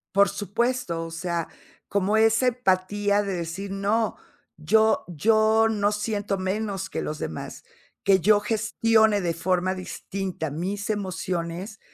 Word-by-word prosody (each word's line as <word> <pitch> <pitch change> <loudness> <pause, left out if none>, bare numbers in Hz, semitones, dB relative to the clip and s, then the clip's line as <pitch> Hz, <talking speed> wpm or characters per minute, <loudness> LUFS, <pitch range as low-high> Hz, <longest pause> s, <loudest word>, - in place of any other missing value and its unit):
Por 200 0 +5
supuesto. 205 -4 -1
O 165 - -8
sea, 170 0 -3 0.4
como 200 +2 +1
esa 225 +3 +4
empatía 205 -3 +1
de 195 -1 -3
decir: 175 +3 -4
"No, 205 +3 0 0.4
yo 220 +8 +3
yo 220 +6 +3
no 205 -1 +1
siento 205 -1 -2
menos 195 0 -2
que - - -3
los 155 0 -4
demás. 80 - -6 0.4
Que 195 -1 +5
yo 210 +2 +5
gestione 220 0 +2
de 170 -2 0
forma 185 +2 0
distinta 185 -2 -5
mis 195 +8 -4
emociones 185 -1 -3
200 Hz, 130 wpm, -25 LUFS, 180-215 Hz, 0.4 s, Por